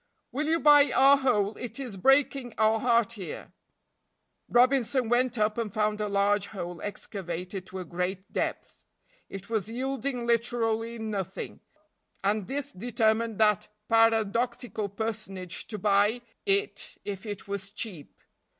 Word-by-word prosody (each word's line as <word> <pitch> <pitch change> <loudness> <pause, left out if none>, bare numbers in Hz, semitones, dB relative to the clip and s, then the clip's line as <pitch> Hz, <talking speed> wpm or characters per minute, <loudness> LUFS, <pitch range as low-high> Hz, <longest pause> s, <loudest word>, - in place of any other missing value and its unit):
"Will 290 +5 -2
you 325 +1 +2
buy 290 -3 +6
our 270 +3 +7
hole, 220 -6 +1
it 245 +2 -6
is 250 -7 -5
breaking 270 +2 +2
our 220 0 +3
heart 235 -1 +3
here." 205 -6 -7 1.0
Robinson 250 -1 +3
went 245 0 +2
up 215 +1 +1
and 220 -3 -2
found 210 +1 0
a 210 - 0
large 200 0 +2
hole 175 -4 -6
excavated 185 -2 -5
to 190 - -8
a 185 - -5
great 180 +3 -4
depth; - - -3 0.5
it 195 0 -8
was 220 -2 -1
yielding 260 +1 -3
literally 230 -1 0
nothing, 205 -4 -4 0.6
and 205 0 0
this 285 +1 -3
determined 220 +1 0
that 210 -3 +3 0.2
paradoxical 225 0 +2
personage 195 -4 -4
to 215 - -5
buy 205 +4 +3 0.3
it 400 +1 0
if 200 +1 -5
it 205 -2 -6
was 200 -1 -4
cheap. 200 -7 -6
220 Hz, 135 wpm, -28 LUFS, 200-245 Hz, 1.0 s, our